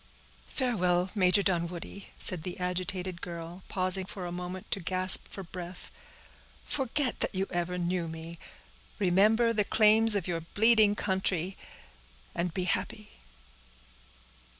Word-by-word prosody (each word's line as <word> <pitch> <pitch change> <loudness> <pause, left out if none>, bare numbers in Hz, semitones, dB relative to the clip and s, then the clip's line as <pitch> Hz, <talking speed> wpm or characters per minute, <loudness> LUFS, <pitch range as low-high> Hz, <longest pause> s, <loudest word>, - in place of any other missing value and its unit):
"Farewell, 185 -8 0
Major 195 0 +3
Dunwoodie," 175 +1 -3
said 180 -3 +7
the 180 +2 -7
agitated 180 0 -4
girl, 170 +1 -8
pausing 185 0 +2
for 190 -2 -7
a 175 - -5
moment 180 +1 -7
to - - 0
gasp 185 +1 +3
for 195 - -6
breath; 180 0 -9 0.7
"forget 270 -1 -1
that - - -2
you 190 +1 0
ever 175 0 -2
knew 175 -1 -2
me—remember 175 - -1
the 210 -2 +1
claims 215 +1 +4
of 195 -4 -2
your 170 -2 -2
bleeding 215 +4 +3
country; 190 -2 -1 0.8
and 175 0 -2
be 185 +3 -3
happy." 185 +4 -3
185 Hz, 125 wpm, -29 LUFS, 175-200 Hz, 0.8 s, said